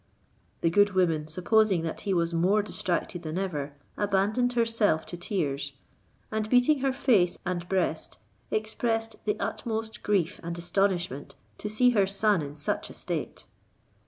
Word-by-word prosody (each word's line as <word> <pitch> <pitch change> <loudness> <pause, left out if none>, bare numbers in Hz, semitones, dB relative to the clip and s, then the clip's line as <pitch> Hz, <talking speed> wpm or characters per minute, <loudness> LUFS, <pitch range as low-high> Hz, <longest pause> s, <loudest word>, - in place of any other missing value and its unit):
The 165 - +2
good 205 +2 +4
woman 165 -5 +2
supposing 185 +2 +2
that 165 - -4
he 200 - -1
was 170 0 +1
more 190 +5 +3
distracted 175 -3 -2
than 160 0 -4
ever, 150 -7 -3 0.2
abandoned 205 +5 +1
herself 230 -8 +2
to - - -6
tears, 145 -6 -2 0.6
and 215 0 -1
beating 250 +5 +4
her 270 0 +1
face 215 -10 +3
and 175 -1 -3
breast, 190 -1 -1 0.3
expressed 225 +1 -1
the 210 0 0
utmost 220 -1 -3
grief 195 -3 0
and 170 0 -5
astonishment 175 -4 -1 0.2
to 210 - -4
see 245 +4 +4
her 200 -5 +3
son 200 -1 +2
in 145 0 -6
such 145 -1 -2
a - - -11
state. - - -4
195 Hz, 150 wpm, -28 LUFS, 170-220 Hz, 0.6 s, good